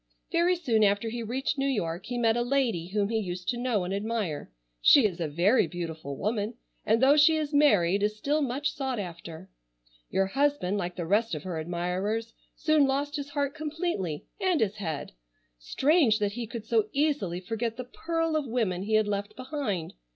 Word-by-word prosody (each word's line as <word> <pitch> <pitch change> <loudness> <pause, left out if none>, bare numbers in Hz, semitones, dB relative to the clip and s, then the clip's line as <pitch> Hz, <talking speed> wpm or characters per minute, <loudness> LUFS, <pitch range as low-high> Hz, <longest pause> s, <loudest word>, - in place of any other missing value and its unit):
Very 345 +1 +3
soon 240 -11 +1
after 205 +2 +2
he 235 +1 -4
reached 260 +5 -2
New 270 - +1
York 180 -8 -2
he 245 0 -3
met 225 -2 +3
a 240 - +1
lady 240 -9 0
whom 200 +1 0
he 225 -1 +1
used 180 -3 -5
to 245 - 0
know 240 -6 0
and 180 +2 -3
admire. 205 -6 -2 0.3
She 270 - +7
is 185 -5 -1
a 165 - -1
very 175 - +3
beautiful 160 -5 -6
woman, 215 +2 -2 0.3
and 225 +3 +2
though 275 +2 +7
she 315 +2 +6
is 305 -1 -3
married 200 - +4
is 210 +1 0
still 290 +7 0
much 275 +2 -1
sought 265 -4 -2
after. 170 -1 -7 0.6
Your 195 - +2
husband, 205 -4 0
like 175 -1 -3
the 175 - -4
rest 205 +2 +1
of 150 - -6
her 175 -4 -4
admirers, 180 +7 -2 0.2
soon 310 -3 +3
lost 285 +2 -1
his 285 -1 -4
heart 285 -1 -1
completely, 300 - -3
and 375 -5 +2
his 215 -1 0
head. 160 -8 -4 0.5
Strange 265 - +3
that 205 -2 0
he 235 +2 -5
could 225 -1 -7
so 430 - +1
easily 280 - 0
forget 225 +4 -3
the 255 - -4
pearl 330 +5 -2
of 300 -3 0
women 220 -7 -1
he 215 +3 0
had 215 -1 +3
left 205 +1 -3
behind! 255 - -3
225 Hz, 195 wpm, -28 LUFS, 185-275 Hz, 0.6 s, She